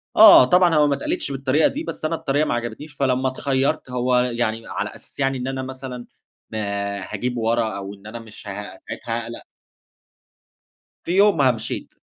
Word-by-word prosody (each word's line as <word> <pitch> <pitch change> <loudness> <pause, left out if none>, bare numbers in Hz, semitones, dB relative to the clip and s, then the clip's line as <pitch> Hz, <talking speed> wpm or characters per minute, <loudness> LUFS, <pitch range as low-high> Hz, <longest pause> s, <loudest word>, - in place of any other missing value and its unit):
آه، 125 - +10
طبعًا 180 +2 +4
هو 150 -1 +5
ما 140 - +2
اتقالِتش 140 - -1
بالطريقة 135 +3 +2
دي، 305 +3 -4
بس 155 - -6
أنا 165 +1 0
الطريقة 145 0 0
ما - - -1
عجبتنيش، 120 +6 -5
فلمّا 130 -1 +1
اتخيّرت 135 +2 -1
هو 125 0 +1
يعني 115 -2 -1
على - - -3
أساس - - -12
يعني 135 -1 +1
إن 125 +1 -4
أنا 135 0 -3
مثلًا 130 -2 -7 0.5
ما 110 - -3 0.4
هاجيب 120 +6 -3
ورا، 115 -2 0
أو 100 0 -6
إن 100 +1 -14
أنا 115 +2 -7
مش 110 -2 -12
ه - - -4
ساعتها 105 +3 -6
هاقلق. 115 - -8 1.6
في - - -4
يومها 165 -11 +5
مشيت، 110 -2 -5
125 Hz, 175 wpm, -22 LUFS, 115-140 Hz, 1.6 s, آه